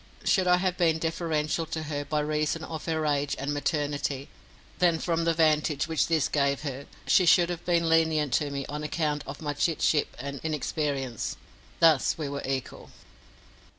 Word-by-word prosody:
Should 185 -1 +2
I 180 0 +5
have 180 0 -1
been 165 -2 +3
deferential 160 -1 -1
to 160 -1 -4
her 145 -1 -3
by 150 +1 -1
reason 155 +1 -1
of 160 -1 -6
her 160 -1 0
age 145 -1 0
and 140 +2 -2
maternity, 145 -1 -2 0.5
then 175 -2 +4
from 165 0 -1
the 165 - +3
vantage 155 -2 +2
which 160 -2 +1
this 160 -4 +2
gave 140 -1 +1
her, 140 -2 -5 0.2
she 180 - +4
should 175 +1 +5
have 175 - -5
been 170 -1 +2
lenient 160 -4 +2
to 145 +2 +1
me 140 -1 -4
on 150 +1 -5
account 150 -1 -1
of - - -7
my 145 -1 -1
chit 160 +3 0
ship 150 - +1
and 140 -1 -5
inexperience. 145 -5 -2 0.4
Thus 160 -5 +4
we 155 -3 -3
were 140 0 -4
equal. 135 -1 -4
155 Hz, 180 wpm, -27 LUFS, 145-165 Hz, 0.5 s, I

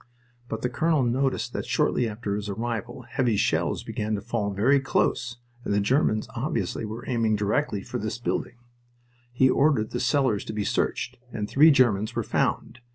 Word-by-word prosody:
But 110 - -4
the 125 - +1
colonel 155 +3 +1
noticed 130 +3 0
that - - -4
shortly 120 -2 +1
after 105 -1 -3
his 105 0 -4
arrival 120 +4 -4
heavy 120 -2 0
shells - - 0
began 105 0 -2
to 100 - -4
fall 110 -2 -2
very 115 +8 +3
close 130 -2 0 0.3
and - - -3
the - - +3
Germans 110 0 +1
obviously - - -2
were 110 +4 -7
aiming 115 -4 +1
directly 105 +1 0
for - - -5
this 110 +3 -3
building. 120 0 -3 0.8
He 130 +2 +4
ordered 135 -5 +2
the 120 - -2
cellars 125 -4 +1
to - - -5
be 105 -1 -2
searched, 125 0 -1
and 105 -2 -3
three 150 +8 +6
Germans 120 -5 +3
were 115 - 0
found. 120 - -1
120 Hz, 175 wpm, -26 LUFS, 105-130 Hz, 0.8 s, three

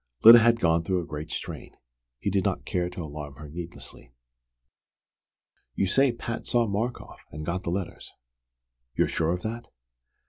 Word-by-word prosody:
Lyda 115 +2 +11
had 115 0 +4
gone 85 -4 +3
through 90 +2 0
a 85 - -4
great 75 0 -6
strain. - - -6 0.4
He 100 - -2
did 95 -1 +1
not - - -1
care 90 -1 -1
to 90 -1 -7
alarm 75 -2 -7
her 75 +1 -10
needlessly. 80 -6 -9 1.6
"You - - +1
say 135 +8 +3
Pat 115 0 -5
saw 120 -1 +3
Markoff, 110 +4 -3
and 75 +1 -7
got 90 +2 -2
the 85 - -4
letters. 90 0 -4 0.8
You're - - +3
sure 80 0 0
of 90 0 -3
that?" 115 +2 -5
90 Hz, 165 wpm, -27 LUFS, 80-115 Hz, 1.6 s, Lyda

